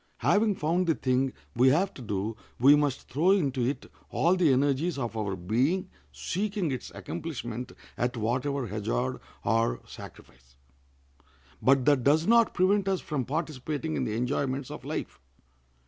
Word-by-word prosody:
Having 210 -1 +2
found 170 +3 0
the 165 - +3
thing 130 +1 +1 0.2
we 125 +2 +5
have 180 +8 +2
to - - -11
do 105 -1 -3 0.2
we 140 +4 +7
must 145 -3 0
throw 155 +8 +1
into 140 -10 +2
it 135 +4 -2 0.2
all 170 +4 +2
the 175 -6 +4
energies 140 +5 +1
of 120 -4 -3
our 105 -3 -2
being, 130 - 0 0.2
seeking 195 -3 -2
its 130 - -5
accomplishment 120 - -5 0.3
at 120 +1 0
whatever 130 +4 -1
hazard 115 +5 -2 0.3
or 115 +1 +1
sacrifice. 65 +1 -13 1.1
But 130 +2 +4
that 145 -4 +4
does 155 +5 +4
not 230 +1 +4
prevent 195 +2 +3
us 190 -2 +1
from 140 -5 -3
participating 155 +1 -3
in - - -1
the 105 - -2
enjoyments 130 +2 -1
of - - -8
life. 70 -1 -5
135 Hz, 150 wpm, -28 LUFS, 120-165 Hz, 1.1 s, we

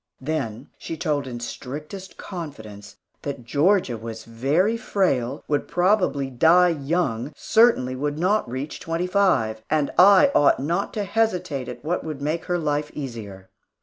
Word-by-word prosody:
Then 135 -4 -4
she 165 - -6
told 150 -4 -1
in 120 -2 -6
strictest 150 +10 -7
confidence 110 - -8 0.3
that 140 -4 -5
Georgia 145 - +2
was 110 0 -7
very 140 - +1
frail, 140 - -1
would 145 -1 -1
probably 175 -7 +1
die 170 +8 +5
young, 145 -5 -1
certainly 220 - +3
would 145 +2 -2
not 185 - +1
reach 130 +4 -5
twenty 165 +2 -2
five; 180 - +1
and 150 -2 +1
I 205 +10 +7
ought 145 - +4
not 170 +8 -1
to 210 - -1
hesitate 185 - -1
at 125 - -9
what 175 +3 -1
would 155 -3 -5
make 155 +4 -2
her 175 - 0
life 150 -2 -1
easier. 110 -9 -7
150 Hz, 150 wpm, -23 LUFS, 125-180 Hz, 0.3 s, I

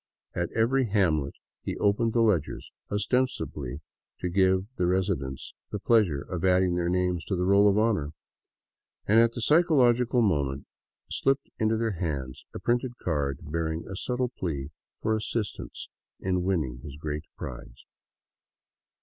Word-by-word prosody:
At 85 -1 -2
every 125 +3 +2
hamlet 80 -9 +1 0.3
he - - -4
opened 110 +3 +2
the 115 - +4
ledgers 95 -10 0
— - - -37
ostensibly 105 - -1 0.4
to 90 - -2
give 95 +1 +3
the 90 - 0
resi 95 +1 +1
dents 65 -1 -7 0.2
the - - -2
pleasure 100 -9 +2
of 90 -3 -5
adding 90 -1 +3
their 85 0 0
names 90 -1 0
to 95 - -1
the 90 0 0
roll 100 +2 +5
of 100 - +2
honor 105 -9 +2 0.5
— - - -55
and 110 +2 +6
at 115 0 +4
the 120 - -5
psychological 125 -6 +4
moment 70 -8 0 0.5
slipped 135 +1 +1
into 110 0 +2
their 110 -5 -1
hands 70 -7 -4
a - - -7
printed 120 +1 0
card 70 -5 -1
bear 80 +2 -2
ing 80 +1 -4
a 95 - -6
subtle 125 +5 -1
plea 80 - -4 0.3
for 110 - +2
assistance 110 -1 -3 0.3
in 90 -1 0
winning 80 -10 -1
his 70 -1 -9
great 75 0 -4
" - - -59
prize." - - -8
95 Hz, 160 wpm, -27 LUFS, 80-115 Hz, 0.5 s, and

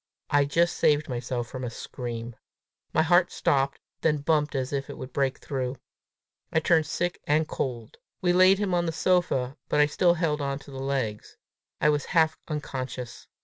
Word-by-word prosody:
I 145 -1 +4
just 170 +4 +1
saved 150 0 +3
myself 120 -1 -3
from 130 +2 -7
a 125 - -2
scream. 115 0 -6 0.6
My 160 - +3
heart 175 +2 +4
stopped, 135 0 +1 0.2
then 155 -2 +2
bumped 150 -1 +1
as 130 +1 -2
if 135 -1 -2
it - - -7
would 130 0 -8
break 135 -2 0
through. 130 -2 -3 0.8
I 160 - +3
turned 160 0 +3
sick 175 +2 -2
and 155 +2 +2
cold. 120 -4 -4 0.2
We 180 -1 +2
laid 185 +2 +6
him 200 -2 -1
on 175 -1 +1
the 165 - -1
sofa, 155 -7 +1
but 150 - +2
I 150 - +7
still 175 +4 +3
held 155 -3 0
on 140 -1 -1
to 140 0 -13
the 135 - -7
legs; 130 -6 -3 0.4
I 150 - +4
was 145 -1 +1
half 160 -1 +4
unconscious. 130 -5 -5
145 Hz, 185 wpm, -27 LUFS, 130-160 Hz, 0.8 s, I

